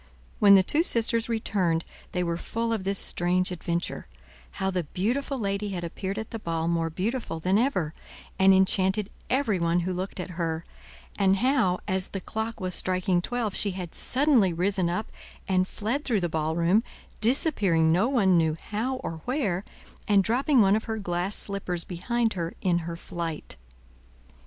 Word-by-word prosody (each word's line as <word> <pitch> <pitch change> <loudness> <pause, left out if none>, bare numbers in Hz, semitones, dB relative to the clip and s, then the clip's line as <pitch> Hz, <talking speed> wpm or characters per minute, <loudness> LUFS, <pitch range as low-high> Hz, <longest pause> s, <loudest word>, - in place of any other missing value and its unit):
When 200 -1 +8
the 190 - +6
two 295 - +1
sisters 230 -6 +1
returned, 185 -7 0 0.3
they 180 - -1
were 170 -1 -1
full 230 +6 -2
of 205 -4 -3
this 195 0 0
strange 180 +1 +1
adventure, 170 0 -3 0.5
how 190 -1 -1
the 180 -3 -2
beautiful 245 - -2
lady 200 -2 -2
had 175 -2 -4
appeared 190 +4 -4
at 220 -1 -5
the 225 - -4
ball 165 -4 -2
more 165 -1 0
beautiful 195 +1 -3
than 185 +5 +2
ever, 185 - 0 0.5
and 190 0 +6
enchanted 190 +1 +3 0.2
everyone 185 -10 +1
who 185 +2 -2
looked 185 +2 -5
at 180 - -5
her; 165 0 -2 0.5
and 195 -1 +4
how 240 -6 +2
as 190 -1 +4
the 195 - -5
clock 220 +4 -4
was 185 -2 -3
striking 185 -1 +1
twelve 230 0 -2
she 200 -2 +3
had 175 -3 -6
suddenly 255 -8 +3
risen 180 +1 0
up 195 +6 -3 0.4
and 185 -1 +2
fled 230 +10 -2
through 225 -9 0
the 175 - +1
ballroom, 165 +6 +2 0.4
disappearing 210 - +3
no 190 +9 +3
one 195 -9 +3
knew 160 -1 +1
how 235 +5 -1
or 160 -1 -5
where, 215 - -1 0.4
and 200 -2 +4
dropping 255 +4 +3
one 195 0 +5
of 220 - -2
her 220 -1 -3
glass 180 0 -2
slippers 185 -4 -3
behind 225 +7 -1
her 170 -2 -4
in 175 -2 +2
her 170 - -4
flight. 170 -2 -6
190 Hz, 170 wpm, -26 LUFS, 175-220 Hz, 0.5 s, When